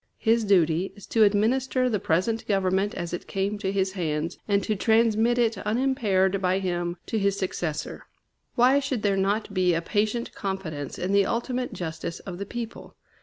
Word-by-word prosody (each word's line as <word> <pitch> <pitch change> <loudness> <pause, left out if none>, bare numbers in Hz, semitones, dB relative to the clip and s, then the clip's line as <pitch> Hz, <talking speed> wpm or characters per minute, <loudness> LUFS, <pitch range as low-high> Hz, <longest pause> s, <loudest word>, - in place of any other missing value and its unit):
His 230 0 +2
duty 180 -3 +2
is 205 - -12
to 225 - +4
administer 250 +5 +2
the 220 -5 0
present 185 +8 0
government 195 0 +1
as 175 -1 -4
it 175 - -5
came 200 +2 -2
to 190 -2 -1
his 190 -1 0
hands, 165 -2 -3
and 200 -1 +2
to 215 - 0
transmit 225 +2 +3
it 230 -4 +1
unimpaired 210 -5 +1
by 185 0 +2
him 175 -2 -2
to 220 - -1
his 200 0 +1
successor. 175 -5 -4 0.5
Why 255 +4 +5
should 265 -5 -3
there 200 -2 +2
not 200 +2 0
be 180 -2 +2
a 165 - 0
patient 215 +5 -1
confidence 175 -8 -4
in 180 +2 -2
the 200 -1 +4
ultimate 250 +2 -2
justice 165 -1 -5
of 180 -2 -7
the 200 - -5
people? 235 0 -7
200 Hz, 175 wpm, -26 LUFS, 185-225 Hz, 0.5 s, Why